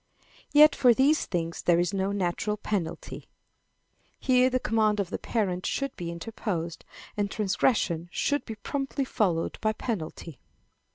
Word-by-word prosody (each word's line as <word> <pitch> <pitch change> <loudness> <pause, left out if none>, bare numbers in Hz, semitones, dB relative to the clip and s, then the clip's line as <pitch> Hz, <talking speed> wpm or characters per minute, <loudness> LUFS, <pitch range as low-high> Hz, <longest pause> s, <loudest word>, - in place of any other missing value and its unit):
Yet 300 +1 +7
for 245 -3 +5
these 285 +5 +3
things 170 -2 -3
there 175 -1 +3
is 175 +2 0
no 195 0 0
natural 200 +2 -1
penalty. 185 -6 -4 0.9
Here 255 0 +4
the 255 0 0
command 215 -2 +1
of 195 -2 -2
the - - -3
parent 185 -6 -1
should 275 -1 -2
be 170 -1 -5
interposed, 170 -1 -4 0.3
and 205 -1 -1
transgression 190 -4 0
should 285 +9 0
be 220 - -7
promptly 275 +5 -3
followed 180 -9 0
by 215 0 +1
penalty. 165 - -5
205 Hz, 140 wpm, -27 LUFS, 175-245 Hz, 0.9 s, Yet